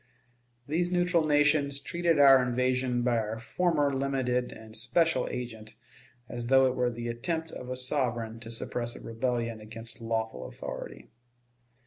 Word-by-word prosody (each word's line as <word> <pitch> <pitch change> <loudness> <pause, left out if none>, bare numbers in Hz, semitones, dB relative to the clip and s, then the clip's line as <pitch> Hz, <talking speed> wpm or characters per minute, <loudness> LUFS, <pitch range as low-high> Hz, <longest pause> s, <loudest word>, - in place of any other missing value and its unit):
These 175 +4 0
neutral 175 -2 +2
nations 145 -1 +3
treated 170 0 0
our 135 -2 +8
invasion 125 0 0
by 120 -1 +2
our 110 0 -3
former 145 +3 +1
limited 130 -2 0
and 110 0 -11
special 130 +4 +2
agent 110 -3 -6 0.5
as 120 0 -5
though 135 +1 +6
it 130 - +2
were 125 -1 +1
the 120 0 -5
attempt 160 +8 -2
of 125 - -8
a 130 - -3
sovereign 120 -4 -1
to 115 -1 -9
suppress 120 +1 -3
a - - -10
rebellion 115 -1 -2
against 115 +2 -6
lawful 115 -1 -2
authority. - - -8
125 Hz, 145 wpm, -29 LUFS, 115-145 Hz, 0.5 s, our